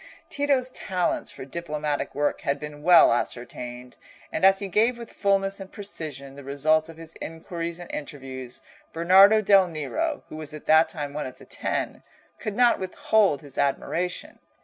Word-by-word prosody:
Tito's 275 -3 +1
talents 185 -7 -2
for - - -9
diplomatic 150 -1 -3
work 145 +1 0
had 140 -3 -1
been 150 0 -8
well 170 -5 +7
ascertained, 125 +1 -4 0.3
and - - -3
as 195 0 +7
he 200 - -3
gave 225 +6 +2
with 235 -1 -9
fulness 195 -1 +1
and 190 0 -9
precision 155 -9 -6
the 140 0 -11
results 155 +4 +1
of 165 - -11
his 165 0 -9
inquiries 165 +1 -5
and 175 -1 -9
interviews, 130 -4 -7 0.3
Bernardo 195 +6 +6
del 195 -2 +5
Nero, 290 - -3
who - - -8
was 155 -1 -5
at 150 - -10
that 155 +1 +5
time 145 -4 -5
one 150 -2 -3
of 130 - -11
the - - -15
Ten, - - -3 0.4
could 210 - -4
not 245 0 +4
withhold 190 -3 +2
his 140 -2 -7
admiration. 170 +5 -1
165 Hz, 170 wpm, -25 LUFS, 145-195 Hz, 0.4 s, well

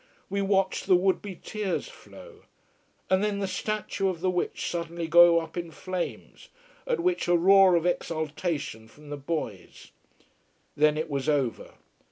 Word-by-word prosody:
We 200 0 0
watched 195 -1 0
the 185 - +6
would 185 +1 +2
be 200 -3 -7
tears 210 +1 -3
flow. 470 -4 -15 0.6
And 190 +1 +2
then 210 -1 0
the 200 - -1
statue 205 0 -2
of 180 -3 -4
the 185 +2 0
witch 180 - -2
suddenly 170 -1 -4
go 170 +1 +7
up 165 -1 -8
in 170 -1 -4
flames, 185 +2 -6 0.4
at - - 0
which 360 - 0
a 175 0 +4
roar 190 +1 +6
of 170 0 +1
exultation 155 -8 -2
from 145 +5 -15
the 145 - -4
boys. 140 - -6 0.8
Then 150 +1 +3
it 160 +1 -2
was 140 -1 -2
over. 140 -6 -1
175 Hz, 160 wpm, -27 LUFS, 155-195 Hz, 0.8 s, go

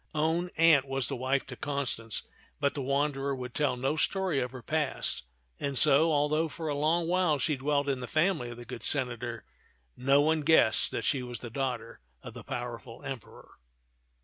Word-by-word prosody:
Own 160 +3 +1
aunt 160 -4 +6
was 135 -2 -1
the - - -3
wife 130 +2 0
to 130 - -8
Constance, 130 -6 -2 0.4
but 140 -1 +1
the 145 - -4
wanderer 140 0 0
would 125 -2 -6
tell 140 -4 +1
no 135 +4 0
story 185 -1 0
of 125 -1 -1
her 130 -1 -10
past, 155 -3 -1 0.4
and 140 -2 -2
so, 155 +3 +5
although 150 +2 +2
for 160 +1 -5
a 145 - -1
long 160 +3 +1
while 175 -3 +2
she 150 +2 0
dwelt 140 +1 0
in 135 -2 0
the 125 - -5
family 155 -6 +1
of 120 - -8
the 120 - -9
good 120 0 -8
senator, 120 -4 0 0.5
no 135 +3 +3
one 155 +2 +3
guessed 145 -7 +4
that - - -3
she 135 -4 +1
was 125 -1 -6
the 120 - -7
daughter 120 -3 -3 0.2
of - - -8
the - - -9
powerful 120 -1 -6
Emperor. 130 -5 -9
140 Hz, 190 wpm, -29 LUFS, 125-155 Hz, 0.5 s, aunt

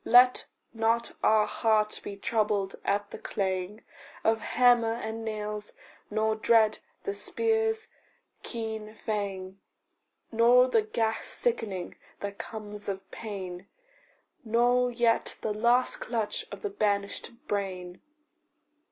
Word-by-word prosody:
Let 250 +1 +6 0.3
not 230 +1 +1
our 215 -1 +5
heart 215 -2 +1
be 200 - -6
troubled 205 -2 0
at 205 +1 0
the - - -7
clang 190 +2 -2 0.4
Of 225 0 +2
hammer 240 -2 +4
and 225 -1 -5
nails, 210 -1 -4 0.4
nor 220 +1 +1
dread 220 0 +4 0.2
the 405 - -2
spear's 445 +1 0 0.5
keen 220 -2 -5
fang, 195 -3 -4 0.7
Nor 245 +2 +6
the 440 - +4
ghast 225 - -1
sickening 205 - -2 0.2
that 200 0 -5
comes 210 -2 -6
of 195 -1 -5
pain, 190 -4 -6 0.8
Nor 245 +2 +3
yet 235 -1 +2
the 215 - -1
last 240 +4 +3
clutch 225 -3 -2
of - - -8
the 415 - -2
banished 205 - 0 0.2
brain. 185 -3 -3
220 Hz, 115 wpm, -29 LUFS, 205-235 Hz, 0.8 s, Let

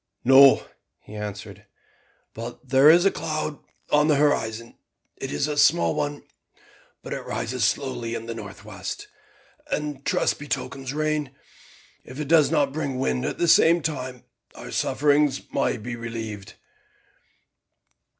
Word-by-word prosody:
"No," 135 +1 +7 0.4
he - - -14
answered, 105 -1 -7 0.7
"but 120 +3 -8
there 135 +3 +6
is 175 +3 +6
a 195 - +5
cloud 155 -1 -4 0.3
in 150 +1 +4
the 150 - +4
horizon. 115 -6 0 0.4
It - - -6
is 75 - -1
a 150 - -2
small 85 - +4
one, 145 0 -3 0.8
but - - -5
it - - -3
rises 125 0 -3
slowly 120 -3 -2
in 115 - -6
the 115 - -5
north 105 -4 -10
west, - - -7 0.6
and 150 -2 -2
I - - -24
trust 140 - 0
betokens 135 -2 -4
rain. 150 -2 -2 0.7
If 130 +3 -11
it 150 - -3
does 160 -1 +5
not 140 -2 +1
bring 140 -4 -3
wind 65 - -1
at - - -3
the 170 - +1
same 165 0 +5
time, 130 -5 -4 0.3
our - - -9
sufferings 145 -1 +1
may 140 - 0
be 120 +2 -6
relieved." 110 -3 -7
135 Hz, 145 wpm, -24 LUFS, 115-150 Hz, 0.8 s, No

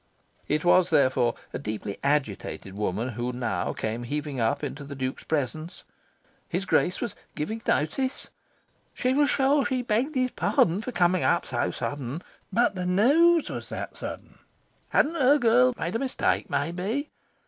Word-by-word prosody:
It 150 +3 0
was, 180 0 +5
therefore, 130 -3 +3 0.2
a - - -3
deeply 105 -2 -5
agitated 135 -9 -1
woman 105 +4 -2
who 120 0 -3
now 120 -8 -2
came 110 +2 -3
heaving 145 +2 -3
up 115 +5 0
into 145 0 -4
the 140 0 -8
Duke's 130 0 -4
presence. 155 +3 -3 0.7
His 185 +3 -2
Grace 180 -1 +1
was 240 - -3 0.2
"giving 220 +9 -3
notice"? 260 - 0 0.7
She 255 0 +1
was 290 0 +3
sure 275 +1 +3
she 255 -2 -1
begged 245 +6 0
his 255 -1 +1
pardon 200 -2 +2
for 255 - -5
coming 180 -3 +2
up - - +2
so - - -1
sudden. 145 +3 -4 0.3
But 235 -1 +3
the 180 -2 -3
news 295 - +4
was - - -6
that - - -5
sudden. - - -8 0.5
Hadn't 310 - +3
her 275 +3 +6
girl 245 0 +4
made 175 +6 -3
a - - +1
mistake, 265 -2 0
maybe? 180 - -2
175 Hz, 160 wpm, -26 LUFS, -, 0.7 s, her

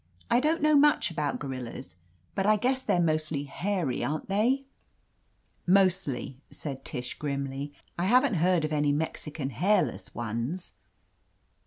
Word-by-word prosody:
I 240 - +5
don't 310 +4 +1
know 305 0 +5
much 295 -9 +4
about 150 -3 -1
gorillas, 130 -4 -6 0.4
but 195 0 0
I 215 - +6
guess 255 +5 +1
they're 180 - +1
mostly 155 -3 0
hairy, 175 -1 -2
aren't 155 +5 -3
they?" 235 +8 +2 1.0
"Mostly," 185 -8 +2
said 135 -3 -6
Tish 125 0 -4
grimly. 140 -1 -3 0.3
"I 175 - +1
haven't 250 +4 +4
heard 175 -1 +2
of 155 - -3
any 145 -1 +2
Mexican 150 -1 -3
hairless 195 - +1
ones." 120 - -3
160 Hz, 135 wpm, -28 LUFS, 140-205 Hz, 1.0 s, I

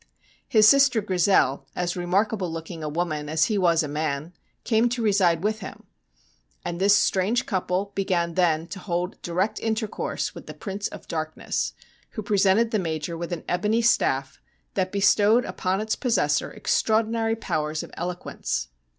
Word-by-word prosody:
His 215 -2 +5
sister 275 -2 +6
Grizel, 180 -9 +2
as 175 0 -1
remarkable 185 +1 0
looking 165 0 -6
a 150 - -2
woman 155 -2 -2
as 160 +1 +3
he 215 - 0
was 170 -3 +3
a - - -3
man, 150 +2 -3 0.3
came 230 +1 +2
to 240 -1 -2
reside 190 -5 +3
with 215 +1 0
him, 195 - -9 0.8
and 170 +1 -4
this 200 +1 +6
strange 205 +7 +2
couple 190 0 -1
began 175 -3 0
then 165 -3 +2
to 195 - -6
hold 175 -1 -3
direct 180 +5 -1
intercourse 220 -1 -2
with - - -11
the - - -8
Prince 200 0 -4
of - - -11
Darkness, 155 -1 -3 0.4
who 215 - -5
presented 205 +3 +3
the 215 - +1
Major 165 -1 -3
with 170 +1 -5
an 175 - -4
ebony 215 +5 +1
staff 135 - +1 0.3
that 185 -1 -1
bestowed 205 +4 +4
upon 185 +1 -1
its 215 +1 -1
possessor 245 -3 +1
extraordinary 225 0 +1
powers 155 -7 -2
of - - -11
eloquence. 175 - -4
185 Hz, 160 wpm, -25 LUFS, 165-215 Hz, 0.8 s, sister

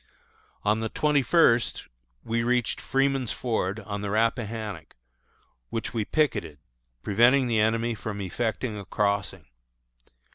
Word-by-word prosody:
On 105 +1 +2
the 110 0 -2
twenty 150 +2 +2
first 125 -4 +3 0.4
we 115 +1 -1
reached 120 0 0
Freeman's 135 -2 0
Ford, 110 -4 -2
on 100 0 -5
the 105 - -3
Rappahannock, 110 - -2 0.7
which 115 - -4
we 110 -3 -1
picketed, 140 - 0 0.5
preventing 120 +6 +4
the 115 -3 +1
enemy 115 +2 +1
from 105 -1 -5
effecting 110 +3 -2
a 100 - -8
crossing. 100 -4 -1
110 Hz, 120 wpm, -26 LUFS, 105-120 Hz, 0.7 s, preventing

